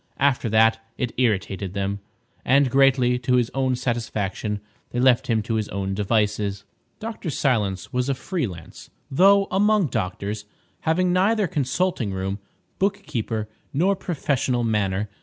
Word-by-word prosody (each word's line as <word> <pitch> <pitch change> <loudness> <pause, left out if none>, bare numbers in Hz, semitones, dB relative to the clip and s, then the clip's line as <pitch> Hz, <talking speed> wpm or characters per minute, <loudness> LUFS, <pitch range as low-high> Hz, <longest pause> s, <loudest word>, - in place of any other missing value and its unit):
After 130 -4 +2
that, 110 +1 +4 0.2
it 125 -2 -2
irritated 100 -5 0
them, 100 0 -2 0.4
and, 135 0 +3
greatly 130 -2 +4
to 125 0 +1
his 120 -1 +2
own 130 -1 +1
satisfaction, 110 -4 -2 0.3
they 120 - -3
left 125 -1 +4
him 110 -3 +1
to 115 - -3
his 110 -2 -1
own 95 0 -2
devices. 105 -1 0 0.4
Dr. 220 -5 -5
Silence 110 -10 0
was 125 +2 0
a 135 - +1
free 165 0 -2
lance, 85 -4 -11 0.2
though, 195 +7 +5
among 205 -3 +3
doctors, 105 0 -3 0.4
having 180 +2 +2
neither 205 +3 +3
consulting 150 - -1
room, 95 +2 -3 0.4
bookkeeper, 125 - -1 0.3
nor 185 +8 +2
professional 140 -8 -1
manner. 105 -2 0
120 Hz, 140 wpm, -23 LUFS, 105-145 Hz, 0.4 s, though